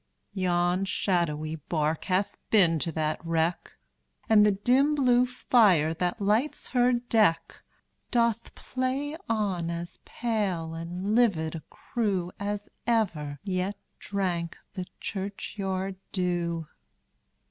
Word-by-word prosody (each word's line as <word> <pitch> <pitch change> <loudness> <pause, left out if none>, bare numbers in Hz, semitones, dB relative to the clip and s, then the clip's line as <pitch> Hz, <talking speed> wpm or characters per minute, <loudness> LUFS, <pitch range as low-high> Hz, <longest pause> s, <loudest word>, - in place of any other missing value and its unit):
Yon 180 -1 +1
shadowy 160 -5 0
bark 155 +1 -1
hath 190 +1 0
been 175 -7 +4
to 165 - -1
that 155 0 -2
wreck, 165 +1 -1 0.5
And 215 -2 +6
the 210 - +6
dim 255 +9 +3
blue 250 -3 +4
fire, 205 -11 +4
that 175 +2 -2
lights 215 +8 0
her 250 -1 +3
deck, 225 -7 +1 0.5
Doth 235 -2 +1
play 260 +4 -2
on 195 -7 0
as 170 0 -5
pale 200 -9 -2
and 175 +5 -3
livid 190 -10 +2
a 165 - -6
crew, 195 -7 -2
As 205 0 -3 0.2
ever 170 -11 0
yet 190 0 -2 0.2
drank 180 -4 -2 0.2
the 185 -1 -5
churchyard 195 -1 -4
dew. 175 -3 -1
190 Hz, 115 wpm, -28 LUFS, 170-220 Hz, 0.5 s, And